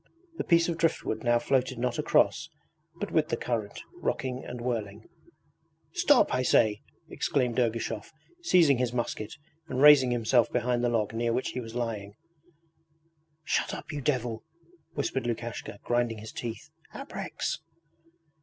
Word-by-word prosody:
The - - +1
piece 170 -1 +4
of 170 -1 -2
driftwood 160 -9 0
now 120 -1 +4
floated 130 +1 0
not 125 +3 -1
across, 150 +1 +2 0.5
but 205 +4 -5
with 155 -1 +2
the - - 0
current, 110 -4 -3
rocking 130 0 -2
and 125 - -7
whirling. 110 -3 -4 0.8
'Stop, 325 -7 +4
I 130 - +2
say!' 110 -4 +3 0.3
exclaimed 125 -3 0
Ergushov, 115 0 -1 0.3
seizing 170 - +4
his 125 -1 0
musket 115 -3 -3 0.3
and 130 - -3
raising 145 -3 +8
himself 120 0 +2
behind 125 0 0
the 120 - +3
log 110 -2 0
near 115 +1 0
which 125 - -1
he 125 - -4
was 115 -1 -8
lying. 105 -4 -3 1.3
'Shut - - 0
up, - - -8
you 145 -1 -4
devil!' 125 -5 -1 0.5
whispered 135 -3 -1
Lukashka, 120 -3 -4
grinding 120 -2 0
his 110 +1 -8
teeth. 115 -2 -6 0.2
'abreks!' - - -4
120 Hz, 145 wpm, -28 LUFS, 115-135 Hz, 1.3 s, raising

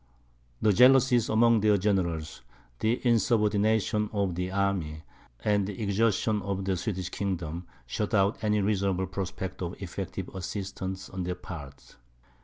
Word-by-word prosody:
The 105 - +5
jealousies 125 0 +5
among 115 +1 +4
their 105 -1 +4
generals, 85 -8 -1 0.4
the 115 +3 +1
insubordination 110 -2 +2
of 100 -4 0
the 90 +2 -2
army, 95 -6 -1 0.4
and 105 -2 +2
the 100 -2 -6
exhaustion 105 0 +1
of 95 0 -3
the 95 -1 +1
Swedish 95 -1 -3
kingdom, 90 -4 -3 0.2
shut 105 - -2
out 100 +2 +2
any 105 -1 +2
reasonable 95 -2 +1
prospect 95 0 -5
of 85 -1 -4
effective 95 0 -5
assistance 95 0 -5
on 95 - -6
their 90 0 -2
part. 75 -7 -10
100 Hz, 135 wpm, -28 LUFS, 90-105 Hz, 0.4 s, The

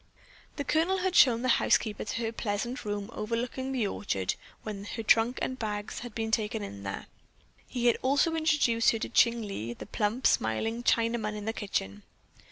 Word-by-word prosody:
The 285 - -2
Colonel 330 +6 +2
had 370 -1 -1
shown 240 -2 +6
the - - +1
housekeeper 210 -2 +2
to 230 - -3
her 225 - -1
pleasant 230 +3 -3
room 205 +1 -3
overlooking 240 +4 -3
the 250 -5 0
orchard 100 - -1 0.3
when 205 -2 -6
her 225 - -4
trunk 225 +3 +4
and 260 0 -3
bags 210 -2 -3
had 240 -2 -8
been 225 -1 -2
taken 210 - -2
there; 95 -1 -5 0.6
he 245 -1 -3
had 240 - +5
also 280 +5 +2
introduced 300 -8 +3
her 225 - +2
to - - -4
Ching 235 -1 +3
Lee, 120 - -4
the - - -8
plump, 220 +5 -1
smiling 220 - +1
Chinaman 230 -3 +1
in 210 -1 -6
the 225 - -1
kitchen. 105 - -3
225 Hz, 175 wpm, -29 LUFS, 205-245 Hz, 0.6 s, shown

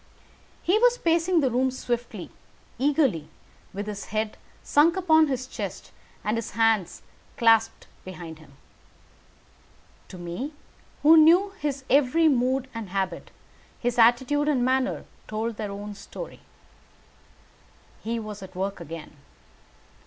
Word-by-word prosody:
He 390 +5 +3
was - - +4
pacing 335 -1 +2
the 265 -3 +1
room 255 +2 +2
swiftly, 245 -2 -4 0.5
eagerly, 265 - +2 0.4
with 200 +2 -5
his 205 -1 -6
head 215 0 -2 0.3
sunk 325 +5 +4
upon 320 -4 +4
his 260 -2 -2
chest, - - -7 0.3
and 210 +2 0
his 230 - -5
hands 225 -6 +1 0.3
clasped 225 -1 +3 0.2
behind 170 -4 -9
him. 150 -3 -17 1.5
To 185 - -10
me, 175 - -5 0.5
who 320 +2 +8
knew 345 +6 +6
his 280 -2 -3
every 290 +4 +4
mood 260 -1 +1
and 225 -4 -6
habit, 190 -2 -3 0.5
his 245 0 -1
attitude 255 +6 +4
and 260 -5 +2
manner 260 0 0 0.2
told 220 +1 -3
their 210 -2 -4
own 205 +1 -6
story. - - -9 1.6
He 230 +1 -2
was 215 -2 -7
at 190 -1 -11
work 195 +2 -3
again. 160 -2 -9
240 Hz, 125 wpm, -26 LUFS, 205-290 Hz, 1.6 s, who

